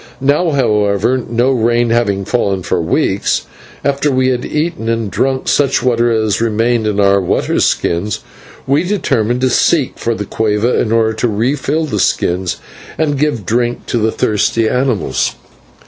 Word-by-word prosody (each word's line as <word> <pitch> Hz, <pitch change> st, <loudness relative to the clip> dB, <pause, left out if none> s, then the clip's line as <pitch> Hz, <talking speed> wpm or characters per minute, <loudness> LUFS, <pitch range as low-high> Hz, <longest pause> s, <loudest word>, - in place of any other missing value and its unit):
Now, 145 Hz, +6 st, +2 dB
however, 110 Hz, -2 st, +1 dB
no 120 Hz, +3 st, +2 dB
rain 120 Hz, -1 st, +1 dB
having 100 Hz, -5 st, 0 dB
fallen 100 Hz, -6 st, -1 dB
for 85 Hz, -, -1 dB
weeks, 80 Hz, -, 0 dB, 0.4 s
after 140 Hz, +1 st, +1 dB
we 130 Hz, 0 st, +2 dB
had 125 Hz, -1 st, -1 dB
eaten, 155 Hz, -7 st, -2 dB
and 115 Hz, -3 st, -1 dB
drunk 130 Hz, +7 st, -1 dB
such 140 Hz, -2 st, +2 dB
water 120 Hz, -1 st, +2 dB
as 110 Hz, -2 st, 0 dB
remained 115 Hz, 0 st, +1 dB
in 105 Hz, -, 0 dB
the 100 Hz, -1 st, +3 dB
water 90 Hz, -, 0 dB
skins, 95 Hz, +5 st, 0 dB, 0.4 s
we 140 Hz, +2 st, +2 dB
determined 125 Hz, -, 0 dB
to 130 Hz, -, +2 dB
seek 145 Hz, +1 st, +1 dB
for 115 Hz, 0 st, -1 dB
the 105 Hz, -, -4 dB
/cueva/ 110 Hz, +3 st, 0 dB
in 110 Hz, -, -2 dB
order 110 Hz, -1 st, +2 dB
to 110 Hz, -, -1 dB
refill 135 Hz, +8 st, -1 dB
the 105 Hz, -9 st, -3 dB
skins 90 Hz, -1 st, 0 dB, 0.4 s
and 145 Hz, -3 st, 0 dB
give 145 Hz, -9 st, -1 dB
drink 120 Hz, +3 st, -1 dB
to 120 Hz, -, -1 dB
the 110 Hz, 0 st, +1 dB
thirsty 110 Hz, +2 st, 0 dB
mules. 125 Hz, -3 st, 0 dB
115 Hz, 160 wpm, -15 LUFS, 105-130 Hz, 0.4 s, the